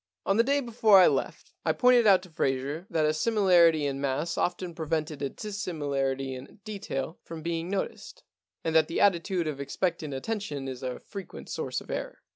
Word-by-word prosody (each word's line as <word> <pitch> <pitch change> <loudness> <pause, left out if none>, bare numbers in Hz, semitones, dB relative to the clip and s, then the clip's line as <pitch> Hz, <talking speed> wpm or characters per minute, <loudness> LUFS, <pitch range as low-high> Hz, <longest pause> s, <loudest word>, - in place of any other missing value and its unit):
* 95 - -60
On 195 - +2
the 230 - +6
day 280 +3 +2
before 225 -4 +5
I 185 - +8
left - - -1
I - - +2
pointed 250 -2 +5
out 190 -2 +6
to 185 - -13
Fraser 140 +3 -2
that 155 -2 +1
a 155 - +2
similarity 175 -5 +4
in 135 -1 -2
mass 140 +4 -1
often 175 0 -1
pre 160 -2 -6
vented 155 -2 -2
a 140 - -1
dissimilarity 140 -9 -3
in 130 +7 -10
detail 175 -8 -4
from 165 -1 -8
being 165 +1 -2
noticed, 195 0 -4 0.4
and 160 - -1
that 160 -1 +5
the 165 - -2
attitude 180 -2 +2
of 145 -3 -4
expectant 155 +1 -2
attention 145 -4 -4
is 130 -2 -6
a 130 -1 -4
frequent 195 -2 -9
source - - -3
of - - -10
error. - - -5
165 Hz, 195 wpm, -28 LUFS, 140-195 Hz, 0.4 s, I